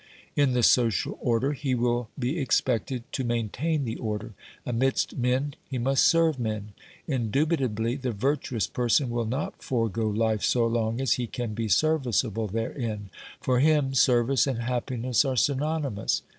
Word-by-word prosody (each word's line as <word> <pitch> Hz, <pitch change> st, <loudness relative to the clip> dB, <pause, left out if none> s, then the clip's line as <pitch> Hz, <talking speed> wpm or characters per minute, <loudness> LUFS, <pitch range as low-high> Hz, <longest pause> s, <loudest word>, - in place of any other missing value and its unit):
In 140 Hz, -3 st, +3 dB
the 125 Hz, -1 st, +1 dB
social 115 Hz, -5 st, +3 dB
order 120 Hz, +4 st, +1 dB
he 135 Hz, -2 st, -1 dB
will 120 Hz, -1 st, 0 dB
be 135 Hz, +5 st, -1 dB
expected 125 Hz, -2 st, 0 dB
to 130 Hz, -, -2 dB
main 120 Hz, -3 st, -1 dB
tain 155 Hz, +4 st, -1 dB
the 115 Hz, -1 st, -3 dB
order; 110 Hz, 0 st, -4 dB, 0.3 s
amidst 130 Hz, +2 st, 0 dB
men 130 Hz, +3 st, 0 dB, 0.2 s
he 130 Hz, -, -3 dB
must 135 Hz, +2 st, +3 dB
serve 165 Hz, -4 st, +3 dB
men. 110 Hz, -3 st, -3 dB, 0.4 s
Indubit 140 Hz, +4 st, 0 dB
ably, 115 Hz, 0 st, -1 dB
the 130 Hz, -3 st, -2 dB
virtuous 125 Hz, 0 st, -1 dB
person 125 Hz, +1 st, +1 dB
will 120 Hz, -1 st, -1 dB
not 130 Hz, +6 st, -3 dB
forego 115 Hz, -3 st, -1 dB
life 110 Hz, 0 st, 0 dB
so 120 Hz, -2 st, +2 dB
long 115 Hz, 0 st, 0 dB
as 135 Hz, -4 st, +2 dB
he 120 Hz, -, -2 dB
can 120 Hz, -1 st, -4 dB
be 115 Hz, +1 st, -2 dB
serviceable 120 Hz, -, +1 dB
therein; 110 Hz, -1 st, -4 dB, 0.3 s
for 125 Hz, -1 st, +2 dB
him 145 Hz, -2 st, +3 dB
service 125 Hz, +1 st, +3 dB
and 120 Hz, -4 st, -2 dB
happiness 125 Hz, 0 st, 0 dB
are 135 Hz, -2 st, -1 dB
synonymous. 145 Hz, -4 st, 0 dB
125 Hz, 155 wpm, -27 LUFS, 115-135 Hz, 0.4 s, In